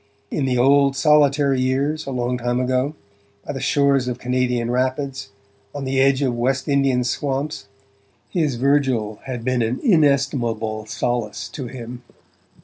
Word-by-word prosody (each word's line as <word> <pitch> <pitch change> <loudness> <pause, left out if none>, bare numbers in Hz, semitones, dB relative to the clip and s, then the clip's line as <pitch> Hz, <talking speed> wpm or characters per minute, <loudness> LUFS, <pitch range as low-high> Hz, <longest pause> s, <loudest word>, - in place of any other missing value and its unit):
In 145 - -1
the 125 -1 0
old 140 +2 +4
solitary 140 -2 +3
years, 140 +4 -1
a - - -3
long 125 -1 -1
time 120 +1 -1
ago, 130 +4 0 0.5
by - - -4
the 135 - -5
shores 140 -2 +2
of 125 -1 -2
Canadian 125 -1 -1
rapids, 130 +1 -2 0.5
on 145 - -4
the 130 0 +1
edge 135 +1 +3
of 130 -3 +1
West 130 +3 -1
Indian 135 -3 +2
swamps, 135 -2 -3 0.6
his 155 -7 0
Virgil 130 -5 +1
had 125 -3 -5
been 130 -1 +1
an 115 +3 -1
inestimable 135 - +1
solace 120 0 -2
to 135 -4 -6
him. 120 -1 -8
130 Hz, 145 wpm, -21 LUFS, 125-140 Hz, 0.6 s, old